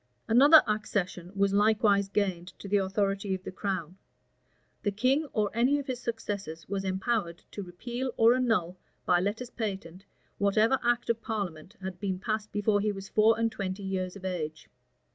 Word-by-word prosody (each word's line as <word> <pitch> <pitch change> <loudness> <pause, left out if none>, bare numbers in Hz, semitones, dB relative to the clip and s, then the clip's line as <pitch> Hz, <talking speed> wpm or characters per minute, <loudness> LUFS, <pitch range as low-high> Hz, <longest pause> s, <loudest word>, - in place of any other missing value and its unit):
Another 285 +7 +8
accession 185 -4 -2
was 200 0 +2
likewise 205 -1 +3
gained 185 -3 -2
to - - -9
the 205 +1 +3
authority 195 0 0
of 185 - -9
the - - -6
crown; 185 -3 -4 0.8
the 205 - 0
king 255 +9 +1
or 210 -1 0
any 250 +6 +3
of 285 - -4
his 255 -3 -3
successors 205 -9 -5
was 195 0 -2
empowered 190 -2 -1
to 205 - -6
repeal 240 +8 -5
or 230 +1 +6
annul, 215 -9 0 0.3
by 175 -1 +4
letters 225 +6 -2
patent, 190 -4 -5 0.4
whatever 215 +6 +3
act 240 0 +2
of 230 0 -4
parliament 190 -7 -4
had 185 -1 -5
been 195 -2 -2
passed 215 +1 -3
before 205 0 +2
he 210 0 +1
was 195 -1 -8
four 220 +1 +4
and 230 0 +1
twenty 195 0 -4
years 185 -1 -3
of 195 -1 -9
age. 155 -4 -4
200 Hz, 170 wpm, -29 LUFS, 185-225 Hz, 0.8 s, Another